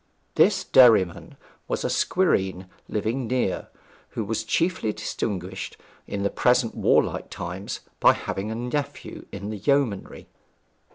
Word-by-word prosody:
This - - +4
Derriman 110 -9 +4 0.3
was - - -2
a - - +1
squireen 95 - +1 0.2
living 115 +4 -2
near, 125 -6 -1 0.5
who 110 - -1
was 110 +2 -2
chiefly 165 0 0
distinguished 95 -4 -4 0.3
in 100 -1 -3
the 100 - +1
present 125 -2 +2
warlike - - +1
time 90 +3 -6 0.3
by - - +7
having 100 +2 -4
a 110 - -3
nephew 140 +5 -4
in 100 +2 -5
the 110 - -4
yeomanry. 125 -4 0
110 Hz, 125 wpm, -25 LUFS, 95-125 Hz, 0.5 s, by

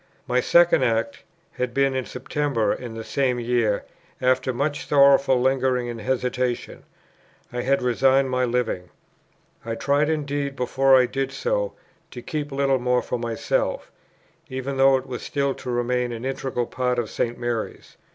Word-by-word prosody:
My 125 0 +1
second 170 +2 +5
act 115 -2 0 0.3
had 125 -1 -4
been 135 -1 +2
in 130 -1 -1
September 135 -8 -1
in 120 -3 -7
the 115 - -6
same 125 0 0
year; 120 -3 0 0.3
after 130 0 +2
much 145 +4 -2
sorrowful 140 -2 +5
lingering 130 -1 +1
and 115 -2 -6
hesitation, 125 0 -2 0.7
I 120 - -2
had 135 +1 +1
resigned 130 +2 +3
my 125 0 +1
Living. 120 -7 -1 0.7
I 115 0 -3
tried 145 +4 +1
indeed, 145 -2 -2
before 135 +1 +4
I 125 - +4
did 135 +2 -2
so, - - -1 0.4
to - - -9
keep 150 -2 -4
Littlemore 130 -3 +1
for 125 - -3
myself, 310 - -2 0.6
even 130 +1 -4
though 135 0 +5
it 130 - -6
was 125 -2 -6
still 140 -1 -1
to 130 - -8
remain 120 0 0
an 115 +1 -6
integral 130 -2 -2
part 125 0 -1
of 120 -2 -1
St. 120 0 -2
Mary's. 120 -2 -4
130 Hz, 155 wpm, -24 LUFS, 120-135 Hz, 0.7 s, second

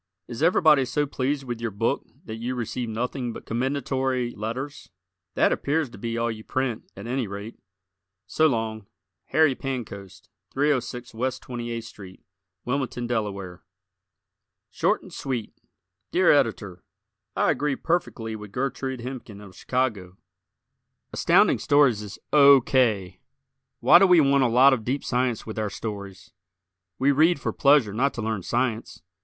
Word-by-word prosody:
Is 120 +1 -7
everybody 155 -4 +5
so 145 +4 0
pleased 140 +1 -2
with 120 -3 -5
your 115 - -1
book 100 -1 -1 0.2
that 110 - -6
you 120 +3 -3
receive 120 0 -4
nothing 120 +2 -3
but - - -10
commendatory 130 0 -1
letters? 120 +7 -6 0.5
That - - +3
appears 145 -2 -1
to 105 - -12
be 115 +1 -3
all 115 0 0
you 110 -1 -8
print, 130 -3 -3
at 100 - -9
any 125 -1 -2
rate. 100 +3 -8 0.7
So 155 +11 +2
long 110 -5 -2 0.4
Harry 155 -3 +3
Pancoast, 115 -8 -7 0.3
306 130 -4 -1
West 130 +3 -3
28th 120 -2 -5
St., 95 -2 -12 0.5
Wilmington, 125 -1 -2
Delaware. 100 -6 -3 1.1
Short - - 0
and - - -13
Sweet 125 -5 -4 0.6
Dear - - +4
Editor: 95 -3 0 0.5
I - - +2
agree 145 -1 -1
perfectly 130 -11 -2
with 105 -2 -10
Gertrude 130 +1 -3
Hemken, 120 -5 -8
of 100 -3 -13
Chicago. 105 -8 -2 1.0
Astounding - - +4
Stories 140 -7 +3
is 105 -1 -8 0.2
O. 140 -2 +8
K. 110 -8 +1 0.6
Why 130 +8 +8
do 195 - +6
we 180 -2 +6
want 140 -2 +4
a - - +4
lot 130 +4 +6
of 115 -4 -2
deep 130 +5 -2
science 125 -2 -1
with 110 0 -5
our 105 -1 -1
stories? 100 -3 -7 0.7
We 135 +2 +3
read 155 +3 +3
for - - -3
pleasure 140 -7 +4
not 135 +6 0
to 120 - -4
learn 110 -2 -2
science. 120 +2 -2
120 Hz, 150 wpm, -25 LUFS, 110-135 Hz, 1.1 s, O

